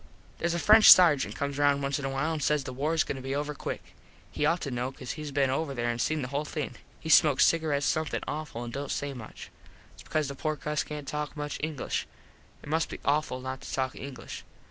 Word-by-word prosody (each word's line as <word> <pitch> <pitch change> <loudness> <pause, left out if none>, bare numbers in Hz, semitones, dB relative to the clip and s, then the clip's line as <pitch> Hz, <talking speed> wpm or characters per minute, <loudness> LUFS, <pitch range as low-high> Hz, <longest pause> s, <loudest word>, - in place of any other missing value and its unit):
Theres 170 0 0
a - - 0
French 215 +5 +8
sargent 160 -7 +6
comes 140 0 -3
round 140 -1 +3
once 140 +1 -1
in 140 - -4
a - - -1
while 135 +4 -1
an 155 - -2
says 150 0 +1
the 130 - -6
war 150 +5 -1
is 160 - +3
goin 135 - -4
to - - -7
be 135 +1 -3
over 145 +1 -2
quick. - - -6 0.4
He 150 - 0
ought 170 +2 +1
to 140 - -4
know 125 +1 -2
cause 130 -2 -7
hes 150 0 -6
been 140 -2 +1
over 140 0 -2
there 120 -1 0
an 120 - -5
seen 155 +3 0
the 125 - -4
whole 140 +2 -1
thing. 150 -1 -5 0.2
He - - -9
smokes 150 -3 +6
cigarets 155 -4 +1
something 155 -2 -1
awful 150 -6 -4
an 120 - -6
dont 140 +2 -5
say 145 -1 -2
much. 115 -4 -10 0.5
Thats - - -12
because 155 -2 -1
the 140 - -5
poor 155 +3 -2
cus 150 0 -2
cant 150 -2 -7
talk 150 +1 -4
much 145 0 -4
English. 150 -3 -3 0.6
It - - -9
must 160 +1 +1
be - - -7
awful 140 -3 0
not 130 0 -5
to - - -8
talk 130 -1 -1
English. 135 -2 -8
145 Hz, 245 wpm, -28 LUFS, 135-155 Hz, 0.6 s, French